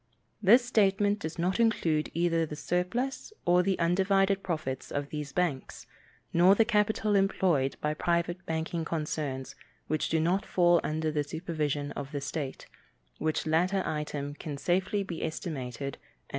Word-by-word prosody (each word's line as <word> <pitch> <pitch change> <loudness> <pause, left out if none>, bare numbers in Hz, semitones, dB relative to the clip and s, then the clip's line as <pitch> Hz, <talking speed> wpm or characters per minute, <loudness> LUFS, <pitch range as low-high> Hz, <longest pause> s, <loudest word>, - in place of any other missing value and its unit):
This 235 +5 +6
statement 205 -3 +2
does 160 -2 -5
not 180 +5 0
include 165 -9 +2
either 165 -1 +2
the 150 -1 -4
surplus 180 - -2
or 175 0 +5
the 190 +1 0
undivided 195 +3 +2
profits 155 -8 -3
of 145 0 -3
these 150 -2 -5
banks, 150 -4 -2 0.5
nor 180 +3 +6
the 225 - +4
capital 215 -1 +1
employed 185 -8 +2
by 150 0 0
private 175 +3 -1
banking 160 +1 -2
concerns 150 -5 -3 0.3
which 155 0 -1
do 160 - +2
not 175 +5 +1
fall 175 -1 +3
under 155 0 -1
the 150 -1 0
supervision 150 -2 -3
of 145 +1 -6
the 145 - -2
state, 140 -1 -4 0.5
which 155 0 -1
latter 180 +5 +2
item 145 -2 -3
can 145 -1 -6
safely 190 +6 0
be 175 -4 -6
estimated 140 -5 -4
at - - -33
$2,000,000. - - -37
170 Hz, 155 wpm, -29 LUFS, 150-190 Hz, 0.5 s, This